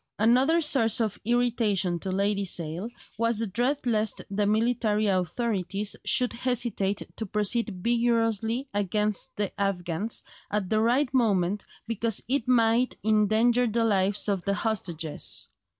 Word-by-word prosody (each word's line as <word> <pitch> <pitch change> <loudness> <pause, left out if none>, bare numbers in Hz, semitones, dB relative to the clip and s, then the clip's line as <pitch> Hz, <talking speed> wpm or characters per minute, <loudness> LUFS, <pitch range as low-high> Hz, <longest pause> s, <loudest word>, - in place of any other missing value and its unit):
Another 255 +10 +3
source 260 -7 +3
of 220 -3 -1
irritation 220 -7 +1
to 190 - -4
Lady 200 +1 0
Sale 175 +2 -2 0.3
was 230 -1 +1
the 225 - 0
dread 245 +8 -1
lest 220 -3 0
the 200 +1 0
military 215 -1 +1
authorities 200 +1 -1
should 250 -2 +2
hesitate 235 -5 -1
to 220 - -3
proceed 210 -1 -2
vigorously 230 +1 +1
against 205 +1 0
the 205 -2 -2
Afghans 190 +1 -2 0.3
at 205 -3 -2
the 215 - +3
right 250 +4 +2
moment 205 -5 +1 0.2
because 230 -1 -1
it 265 -1 0
might 240 0 +2
endanger 220 +3 +3
the 230 +1 0
lives 200 -1 +1
of 195 -3 -1
the 200 0 0
hostages. 175 -8 -1
220 Hz, 135 wpm, -27 LUFS, 200-235 Hz, 0.3 s, Another